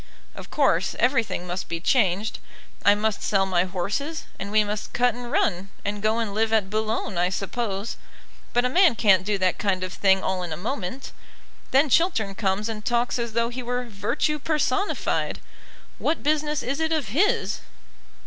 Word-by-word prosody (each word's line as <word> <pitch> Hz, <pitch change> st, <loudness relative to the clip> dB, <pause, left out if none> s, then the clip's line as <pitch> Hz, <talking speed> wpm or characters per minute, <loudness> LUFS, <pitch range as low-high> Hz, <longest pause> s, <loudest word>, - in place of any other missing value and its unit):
"Of -, -, -10 dB
course, -, -, +2 dB
everything 235 Hz, -7 st, +1 dB
must 180 Hz, 0 st, -4 dB
be 170 Hz, -, -2 dB
changed. 210 Hz, +1 st, +1 dB, 0.4 s
I 205 Hz, +1 st, +6 dB
must 215 Hz, 0 st, -1 dB
sell 195 Hz, -2 st, +2 dB
my 185 Hz, -1 st, +2 dB
horses, 205 Hz, -, -3 dB, 0.2 s
and 200 Hz, -, -4 dB
we 215 Hz, +1 st, +4 dB
must 210 Hz, 0 st, -4 dB
cut 245 Hz, -1 st, +3 dB
and 240 Hz, +1 st, -7 dB
run, 190 Hz, -1 st, +1 dB, 0.2 s
and 205 Hz, 0 st, -2 dB
go 215 Hz, +2 st, +2 dB
and 225 Hz, -3 st, -2 dB
live 220 Hz, +1 st, +1 dB
at 210 Hz, -3 st, +1 dB
Boulogne, 215 Hz, -3 st, -1 dB
I 180 Hz, +1 st, +2 dB
suppose. 200 Hz, +2 st, -3 dB, 0.5 s
But 245 Hz, +1 st, +2 dB
a -, -, +2 dB
man 350 Hz, -1 st, +5 dB
can't 195 Hz, -5 st, +4 dB
do 205 Hz, +1 st, 0 dB
that 185 Hz, -1 st, +1 dB
kind 190 Hz, -3 st, 0 dB
of 185 Hz, -1 st, -4 dB
thing 190 Hz, -1 st, +3 dB
all 190 Hz, -1 st, -1 dB
in 175 Hz, -2 st, -5 dB
a 155 Hz, -, -3 dB
moment. 235 Hz, +4 st, -4 dB, 0.6 s
Then 275 Hz, +4 st, +4 dB
Chiltern 260 Hz, -, +2 dB
comes 195 Hz, +1 st, -1 dB
and 215 Hz, -2 st, -5 dB
talks 240 Hz, +2 st, 0 dB
as 235 Hz, -2 st, -3 dB
though 235 Hz, +1 st, +1 dB
he 250 Hz, +1 st, -5 dB
were 245 Hz, +1 st, -2 dB
Virtue 235 Hz, +8 st, -1 dB
personified. 305 Hz, +5 st, 0 dB, 0.6 s
What 315 Hz, -, 0 dB
business 300 Hz, 0 st, +1 dB
is 275 Hz, +4 st, -2 dB
it 320 Hz, 0 st, 0 dB
of 305 Hz, -10 st, 0 dB
his?" 350 Hz, -, +1 dB
220 Hz, 180 wpm, -25 LUFS, 195-250 Hz, 0.6 s, I